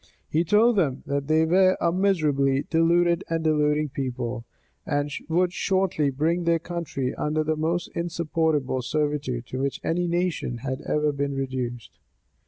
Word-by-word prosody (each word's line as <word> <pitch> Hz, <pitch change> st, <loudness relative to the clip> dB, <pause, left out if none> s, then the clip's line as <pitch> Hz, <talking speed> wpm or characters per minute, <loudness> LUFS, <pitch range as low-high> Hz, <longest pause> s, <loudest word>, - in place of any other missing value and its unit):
He 160 Hz, +2 st, +1 dB
told 215 Hz, +6 st, +4 dB
them, 140 Hz, -8 st, 0 dB
that 140 Hz, 0 st, -2 dB
they 160 Hz, +1 st, +3 dB
were 185 Hz, +3 st, +4 dB
a 170 Hz, -, +2 dB
miserably 150 Hz, -8 st, +1 dB
deluded 170 Hz, +2 st, +3 dB
and 165 Hz, -1 st, -1 dB
deluding 150 Hz, -1 st, +2 dB
people; 125 Hz, -3 st, -4 dB, 0.4 s
and 145 Hz, -1 st, -1 dB, 0.2 s
would 180 Hz, +2 st, +2 dB
shortly 185 Hz, -7 st, +1 dB
bring 160 Hz, +6 st, 0 dB
their 170 Hz, 0 st, +3 dB
country 165 Hz, -6 st, -4 dB
under 155 Hz, +1 st, -1 dB
the 155 Hz, +1 st, 0 dB
most 165 Hz, +3 st, -1 dB
insupportable 160 Hz, -5 st, -1 dB
servitude 145 Hz, -3 st, -2 dB
to 130 Hz, -, -5 dB
which 140 Hz, 0 st, -2 dB
any 175 Hz, +2 st, 0 dB
nation 170 Hz, -7 st, -1 dB
had 130 Hz, -1 st, -3 dB
ever 150 Hz, 0 st, +1 dB
been 140 Hz, 0 st, -2 dB
reduced. 130 Hz, -3 st, -4 dB
155 Hz, 150 wpm, -25 LUFS, 140-170 Hz, 0.4 s, told